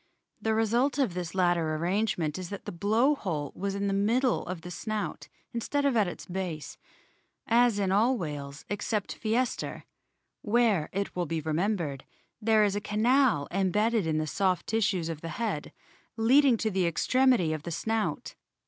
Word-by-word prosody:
The 220 0 +1
result 235 +6 +2
of 260 -10 +1
this 180 0 -5
latter 175 -4 +2
arrangement 175 -2 -1
is 180 -2 -6
that 200 - -7
the - - -4
blow 220 - +2
hole 160 - -3
was 200 +1 -3
in 200 0 -2
the 200 - 0
middle 230 +6 +2
of 180 -1 -5
the 180 +2 -8
snout 215 +3 -4 0.3
instead 285 +5 -1
of 275 -3 +2
at 210 -4 +3
its 175 - -7
base, 175 -4 -5 0.7
as 235 -2 +4
in 195 -2 0
all 230 +6 +3
whales 145 -5 -6
except 205 0 -3
Pkyseter, 235 +3 -1 0.6
where, 215 -7 +2
it 200 +1 -3
will 175 -2 -1
be 165 +1 -1
remembered, 160 -2 -1 0.4
there 220 0 +4
is 205 -1 +1
a 205 - -1
canal 220 - +2
embedded 200 +2 +1
in 155 -1 0
the 155 - 0
soft 185 +3 0
tissues 195 -6 0
of 160 -2 -5
the 165 - -5
head 210 -11 -2 0.5
leading 255 +2 +5
to 220 0 -1
the 185 -2 +1
extremity 240 -1 +3
of 155 - -4
the 170 - -6
snout. 220 +6 -2
200 Hz, 170 wpm, -28 LUFS, 170-225 Hz, 0.7 s, leading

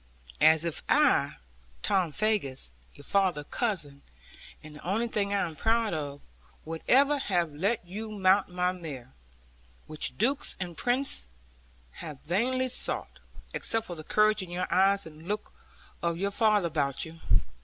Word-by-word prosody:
As 160 +1 +6
if 170 - -3
I, - - +4 0.5
Tom 185 -5 +1
Faggus, 145 - -1 0.2
your - - -13
father's 185 -7 +1
cousin 165 - -2 0.6
and 155 0 -11
the - - -13
only 215 +7 0
thing 205 -3 -1
I 200 -2 +2
am 160 - -9
proud 225 +2 +1
of 145 -2 -4 0.4
would 160 0 -5
ever 280 +3 +5
have 175 - 0
let 195 +7 0
you 210 +5 -6
mount 195 -2 +3
my 180 0 +1
mare, 150 - -8 0.7
which 155 -1 -3
dukes 270 +6 +1
and 175 -2 -4
princes 245 - +2 0.6
have 150 - -8
vainly 255 +10 0
sought, - - -1 0.3
except 225 0 -1
for 180 - -6
the 155 - -9
courage 215 +4 +3
in 185 - -7
your 175 +1 -2
eyes, 195 +1 +4
and 155 -1 -12
the - - -14
look 210 +1 -3 0.5
of 170 -1 0
your 200 +3 -1
father 210 -2 +3
about 145 -4 0
you. 160 +1 -11
185 Hz, 155 wpm, -29 LUFS, 160-215 Hz, 0.7 s, As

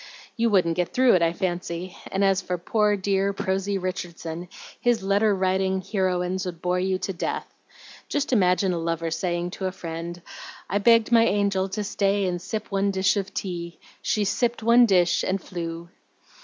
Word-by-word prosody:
You 235 -1 +2
wouldn't 180 -5 +2
get 180 -1 -1
through 255 -1 +5
it, 180 - +4
I 165 0 +3
fancy; 175 -1 -3 0.2
and 195 +1 0
as 195 -1 +3
for 180 - -3
poor, 210 +4 +1
dear, 195 0 0
prosy 195 +1 -1
Richardson, 175 -2 -5 0.3
his 240 -4 +1
letter 200 +2 +3
writing 190 0 +1
heroines 185 -1 -1
would 170 -2 -6
bore 180 +1 0
you 185 0 0
to 195 - -4
death. 175 - -3 0.6
Just 290 -2 -1
imagine 185 -3 +3
a 170 - -2
lover 165 0 -2
saying 175 0 -2
to 190 0 -3
a - - -2
friend, 170 -1 -6 0.5
'I 200 - +2
begged 230 +2 +4
my 230 -1 +6
angel 200 -2 +1
to 210 +2 -3
stay 200 0 +1
and 175 -1 -2
sip 215 +4 -5
one 200 0 +1
dish 190 +1 +2
of 195 -1 -2
tea. 170 -3 -5 0.2
She 210 -1 0
sipped 235 +3 0
one 235 +1 +6
dish 180 -3 +3
and 190 +1 0
flew.'" 170 -2 -6
190 Hz, 180 wpm, -25 LUFS, 175-200 Hz, 0.6 s, my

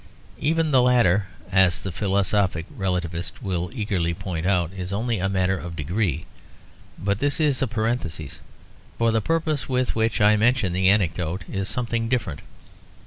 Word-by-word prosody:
Even 160 +1 +1
the 130 -3 +5
latter, 105 -6 +3 0.2
as 95 -3 +4
the 95 - -5
philosophic 95 -2 0
relativist 90 -3 -2
will 90 -2 -2
eagerly 95 -8 -1
point 85 -1 -4
out, 90 -3 +1
is 95 -1 -5
only 110 +2 -1
a 95 +1 0
matter 95 0 +1
of 85 -1 -7
degree. 80 +1 -1 0.7
But 100 +2 -1
this 145 +2 0
is 145 -5 +2
a 135 - +2
parenthesis; 110 - -3 0.6
for 115 -1 +2
the 110 0 +1
purpose 155 -2 -1
with 130 -1 +1
which 115 0 +1
I 105 0 +5
mentioned 110 -5 +2
the 95 0 +4
anecdote 90 -3 +1
is 95 0 -2
something 115 -2 -1
different. 105 - -1
100 Hz, 155 wpm, -24 LUFS, 90-115 Hz, 0.7 s, the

